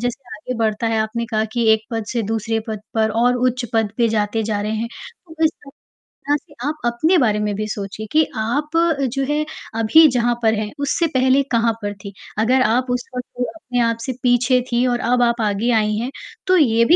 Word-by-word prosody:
जैसे 245 +2 -2 0.2
आगे 250 +4 -5
बढ़ता 220 0 0
है, 225 -1 +1
आपने 225 +2 -2
कहा 220 -1 0
कि 235 -1 0
एक 220 0 +1
पद 225 -2 -2
से 235 -2 0
दूसरे 225 0 -1
पद 215 -2 -4
पर 220 -1 +2
और 245 +1 +3
उच्च 250 0 -3
पद 225 -2 +1
पर 235 - +4
जाते 210 +1 0
जा 210 -1 -1
रहे 210 +1 -2
हैं, 230 +2 -3 0.4
तो 320 0 -2
इस 315 - +4 0.6
तरह 290 +1 -2
से - - -21
आप 305 - -1
अपने 310 +10 +2
बारे 215 -7 +2
में 210 - -1
भी 215 +1 -3
सोचिए 205 +1 -5
कि 310 0 +4
आप 240 +8 -1 0.4
जो 275 0 -1
है 300 +1 +1 0.3
अभी 225 +9 +6
जहाँ 240 -1 +1
पर 220 0 +4
हैं, 210 -1 -3
उससे 285 +4 +1
पहले 260 +2 +4
कहाँ 230 -1 +2
पर 205 0 -3
थी। 200 -1 -8 0.3
अगर 250 +4 +3
आप 245 +3 +1
उस 245 0 -1
वक़्त 250 0 -4
अपने 250 -6 -3
आप 230 -1 +1
से 260 - -2
पीछे 250 +1 +3
थी 240 +1 +2
और 245 -1 0
अब 250 0 +3
आप 235 0 +1
आगे 215 +3 0
आई 215 0 0
हैं, 240 +4 -3 0.4
तो 370 0 +5
ये 230 -7 +4
भी 330 - +6
235 Hz, 220 wpm, -20 LUFS, 220-255 Hz, 0.6 s, अभी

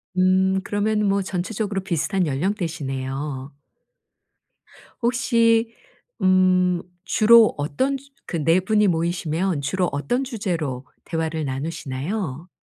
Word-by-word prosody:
음 190 +1 +3
그러면 210 +1 0
뭐 200 0 +2
전체적으로 195 +2 -3
비슷한 180 +2 0
연령대시네요. 140 -5 -3 1.5
혹시 230 -2 +2 0.5
음 185 -1 +3 0.2
주로 225 0 +6
어떤 155 - -1
주 275 +1 -19 0.2
그 165 -4 -2
4 165 +4 +4
분이 210 +2 +2
모이시면 170 0 -1
주로 180 +5 0
어떤 245 - -1
주제로 170 - -3 0.2
대화를 160 -1 -2
나누시나요? 150 +4 -4
185 Hz, 235 characters per minute, -23 LUFS, 155-210 Hz, 1.5 s, 주로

